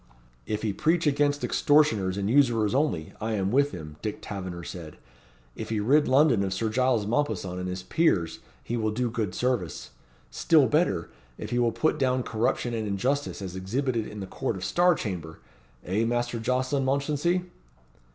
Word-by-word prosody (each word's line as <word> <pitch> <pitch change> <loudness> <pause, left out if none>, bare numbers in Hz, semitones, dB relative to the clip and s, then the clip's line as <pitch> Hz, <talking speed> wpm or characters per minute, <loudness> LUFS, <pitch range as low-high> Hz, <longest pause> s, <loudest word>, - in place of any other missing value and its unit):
"If 105 0 -2
he 105 -3 0
preach 160 - +1
against 145 0 +2
extortioners 110 -11 +3
and 100 -1 -1
usurers 115 -4 +3
only, 135 - 0
I 110 +1 -1
am 100 -2 0
with 140 +3 +3
him," 75 - -9
Dick 105 -1 -3
Taverner 90 -4 -6
said. 80 -4 -8 0.6
"If - - -6
he 110 -1 0
rid 145 +8 +3
London 130 -5 +4
of 95 0 -2
Sir 110 +3 -1
Giles 125 -2 +1
Mompesson 105 -7 -1
and 90 0 -3
his 90 0 -5
peers 95 - +1 0.2
he 120 - -3
will 110 -1 0
do 120 +2 -1
good 110 -6 -2
service 120 - -2 0.4
still 155 -4 +4
better, 130 - +1 0.3
if - - -7
he 120 - +1
will 120 -1 +3
put 155 +5 0
down 130 -1 +1
corruption 120 +2 -1
and 110 -2 -2
injustice 125 +4 -1
as 95 -1 -6
exhibited 115 +5 -1
in 105 -1 -8
the - - -4
Court 120 +4 -3
of 90 -1 -5
Star 175 - +3
Chamber 85 - -5 0.5
eh, 100 +5 0
Master 120 0 -1
Jocelyn 130 +4 0
Mounchensey?" 145 +6 0
115 Hz, 175 wpm, -27 LUFS, 95-140 Hz, 0.6 s, London